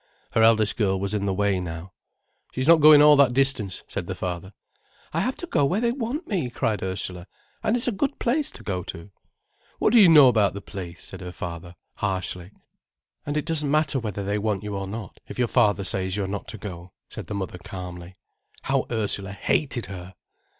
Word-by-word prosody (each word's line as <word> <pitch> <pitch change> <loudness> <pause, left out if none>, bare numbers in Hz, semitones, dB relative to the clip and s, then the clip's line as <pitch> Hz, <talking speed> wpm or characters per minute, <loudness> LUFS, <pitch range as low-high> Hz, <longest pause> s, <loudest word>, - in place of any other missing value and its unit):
Her 115 - +2
eldest 110 -2 +4
girl 95 -4 +1
was 100 +1 -2
in 100 -1 -1
the 95 - 0
way 100 -1 +1
now. 85 +1 -7 0.6
"She's 130 +2 -2
not 165 0 +7
going 150 -1 +9
all 150 0 +8
that 135 -4 +5
distance," 135 -8 +1
said - - -4
the - - -4
father. 90 +1 -5 0.6
"I - - 0
have 255 - 0
to - - -7
go 245 - +1
where 180 +9 +1
they 235 0 +1
want 270 +7 -4
me," 175 - -1
cried 110 -4 -1
Ursula. 95 -1 -4 0.3
"And 220 - +1
it's 245 +1 0
a - - +2
good 275 +7 -1
place 275 +5 0
to - - -12
go 95 -3 -2
to." 85 +4 -9 0.7
"What 215 - +2
do 240 - +8
you 185 - +8
know 150 -4 +9
about 105 -6 +3
the - - -4
place?" 90 -4 -8
said 95 - -10
her 90 -1 -6
father 85 0 -7 0.2
harshly. 95 -2 -2 0.8
"And 145 +1 -1
it 150 - -1
doesn't 150 -3 -1
matter 150 -2 +2
whether 105 -4 -4
they 100 +2 -1
want 105 -2 -1
you 105 -1 -4
or 95 0 -4
not, 105 -1 -7
if - - -9
your 125 -1 +2
father 105 -5 +2
says 95 +1 -1
you 100 - 0
are - - -3
not 100 +1 -5
to 110 - -7
go," 90 -3 -9
said - - -9
the 105 - -4
mother 95 -2 -4
calmly. 90 0 -8 0.5
How - - 0
Ursula 100 -4 -1
hated 120 +2 -1
her! 95 -1 -9
105 Hz, 215 wpm, -25 LUFS, 95-140 Hz, 0.8 s, going